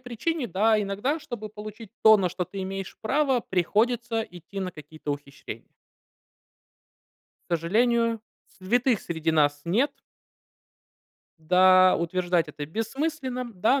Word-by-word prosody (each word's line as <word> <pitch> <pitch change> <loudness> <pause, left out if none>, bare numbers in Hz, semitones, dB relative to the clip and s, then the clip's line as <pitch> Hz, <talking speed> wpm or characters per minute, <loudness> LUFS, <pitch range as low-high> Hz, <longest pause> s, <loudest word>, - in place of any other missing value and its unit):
причине, 255 +4 -2
да, 215 +2 +2
иногда, 205 +10 -1
чтобы 240 -8 -7
получить 215 0 -10
то, 220 0 +9
на 190 -3 +1
что 180 +1 -3
ты 195 +2 -6
имеешь 195 0 -5
право, 265 +2 +1
приходится 225 +5 0
идти 180 +1 -9
на 185 -1 -3
какие-то 155 -1 -8
ухищрения. 140 -1 -9 1.8
К 175 - +1
сожалению, 230 +6 +1 0.3
святых 235 +4 +1
среди 160 -1 -2
нас 145 -2 +2
нет. 235 - +1 1.5
Да, 185 +3 +5
утверждать 175 -1 0
это 145 0 -6
бессмысленно, 255 - -3
да. 220 +8 +2
205 Hz, 115 wpm, -26 LUFS, 175-240 Hz, 1.8 s, то